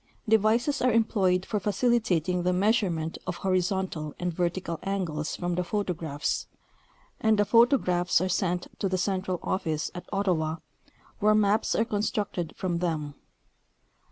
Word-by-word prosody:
Devices 220 Hz, +6 st, +3 dB
are 255 Hz, 0 st, +3 dB
employed 195 Hz, -5 st, +2 dB
for 210 Hz, -, -1 dB
facilitating 195 Hz, -4 st, +1 dB
the 180 Hz, +1 st, +1 dB
measurement 180 Hz, -5 st, +1 dB
of 180 Hz, -, -2 dB
horizontal 185 Hz, -4 st, -1 dB
and 180 Hz, -1 st, -2 dB
vertical 170 Hz, -1 st, -2 dB
angles 170 Hz, -6 st, -2 dB
from 175 Hz, 0 st, -2 dB
the 180 Hz, -, 0 dB
photograjjhs, 170 Hz, -6 st, -2 dB, 0.7 s
and 220 Hz, -1 st, +3 dB
the 205 Hz, -, +3 dB
photographs 230 Hz, -7 st, +3 dB
are 185 Hz, -, 0 dB
sent 180 Hz, -1 st, 0 dB
to 195 Hz, -, 0 dB
the 185 Hz, -, 0 dB
central 185 Hz, -1 st, -1 dB
office 160 Hz, -5 st, -1 dB
at 180 Hz, -, -9 dB
Ottawa, 175 Hz, -6 st, 0 dB, 0.6 s
where 215 Hz, 0 st, +4 dB
maps 210 Hz, 0 st, +2 dB
are 225 Hz, -, +2 dB
constructed 205 Hz, -5 st, -2 dB
from 175 Hz, -2 st, -1 dB
them. 155 Hz, -4 st, -2 dB
185 Hz, 135 wpm, -27 LUFS, 175-210 Hz, 0.7 s, where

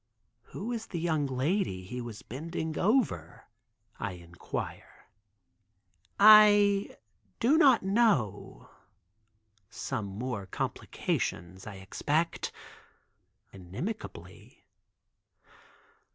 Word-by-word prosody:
"Who 225 Hz, +5 st, -6 dB
is 225 Hz, -2 st, -4 dB
the 170 Hz, -, -4 dB
young 160 Hz, -4 st, 0 dB
lady 130 Hz, -, -1 dB
he 125 Hz, +7 st, -6 dB
was 115 Hz, -3 st, -8 dB
bending 160 Hz, +4 st, -5 dB
over," 190 Hz, -, 0 dB, 0.6 s
I 105 Hz, -4 st, -3 dB
inquire. 85 Hz, -1 st, -8 dB, 1.1 s
"I 205 Hz, -1 st, +7 dB, 0.4 s
do 265 Hz, +6 st, +4 dB
not 270 Hz, -, +5 dB
know, 190 Hz, -, 0 dB, 1.0 s
some 120 Hz, -4 st, -4 dB
more 105 Hz, 0 st, -5 dB
complications 95 Hz, 0 st, -3 dB
I 105 Hz, -, -7 dB
expect," 150 Hz, -, -2 dB, 1.0 s
inimicably. 100 Hz, -, -8 dB
150 Hz, 80 wpm, -29 LUFS, -, 1.1 s, I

